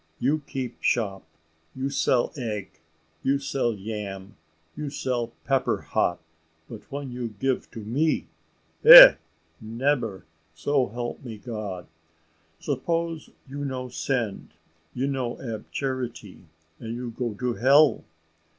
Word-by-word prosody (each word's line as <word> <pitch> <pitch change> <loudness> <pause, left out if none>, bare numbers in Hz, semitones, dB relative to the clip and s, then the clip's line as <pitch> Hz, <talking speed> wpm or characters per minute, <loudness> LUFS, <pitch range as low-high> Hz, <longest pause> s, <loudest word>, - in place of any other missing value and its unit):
You 150 +4 0
keep 130 -3 -5
shop 95 -7 -1 0.5
you 135 +1 -3
sell 130 -3 +1
egg 110 -7 -4 0.5
you 140 +1 +2
sell 135 -4 -1
yam 100 -1 -7 0.4
you 150 -1 -4
sell 125 -4 -2 0.2
pepper - - +1
hot 90 - 0 0.5
but 110 +4 -12
when 140 -1 -5
you 120 -3 -5
give 135 -1 -1
to 115 - -9
me? 135 +10 0 0.6
Eh! - - +13 0.5
nebber, 115 -2 -1 0.3
so 135 - +1
help 120 +5 -6
me 115 -4 -7
God. 105 -6 -6 0.7
Suppose 165 +3 -2 0.2
you 140 +2 -6
no 130 -2 -4
send 120 -5 -3 0.4
you 130 +2 -1
no 130 -4 -3
ab 115 -4 -7
charity, 125 -8 -5 0.3
and 115 0 -6
you 120 -1 -5
go 120 -2 -4
to 125 +3 -2
hell. 140 +2 +4
125 Hz, 125 wpm, -25 LUFS, 110-140 Hz, 0.7 s, Eh